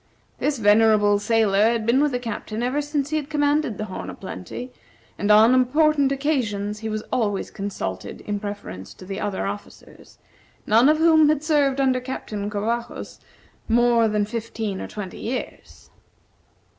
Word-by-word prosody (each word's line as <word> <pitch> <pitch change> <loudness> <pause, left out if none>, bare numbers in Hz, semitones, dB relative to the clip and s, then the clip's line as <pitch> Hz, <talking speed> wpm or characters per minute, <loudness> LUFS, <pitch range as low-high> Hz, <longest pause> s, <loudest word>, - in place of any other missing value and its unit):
This 290 -2 0
venerable 210 -1 +4
sailor 215 -1 +3
had 230 -2 -1
been 245 +4 +3
with 295 -1 +2
the 250 - 0
Captain 225 -1 -5
ever 260 +4 0
since 290 -1 -2
he 310 - +1
had 295 -1 -4
commanded 290 -5 +1
the 215 - -3
"Horn 185 - -7
o' - - -7
Plenty," 195 - -8 0.4
and 205 - -2
on 215 +3 +7
important 285 +2 +3
occasions 220 -8 -1
he 220 0 -4
was 215 0 -3
always 205 -5 -1
consulted 95 - -5
in 205 -1 -3
preference 205 - -7
to 185 - -12
the 195 +2 -5
other 205 -2 -2
officers, 205 +1 -9 0.5
none 230 +6 +5
of 305 - +4
whom 315 -2 +5
had 305 -1 +1
served 290 -4 +2
under 260 -2 +2
Captain 215 -5 -5
Covajos 225 +3 -4 0.5
more 235 0 +4
then 210 -1 0
fifteen 220 -2 -4
or - - -5
twenty 200 -3 -7
years. 250 +3 -6
225 Hz, 160 wpm, -23 LUFS, 205-275 Hz, 0.5 s, on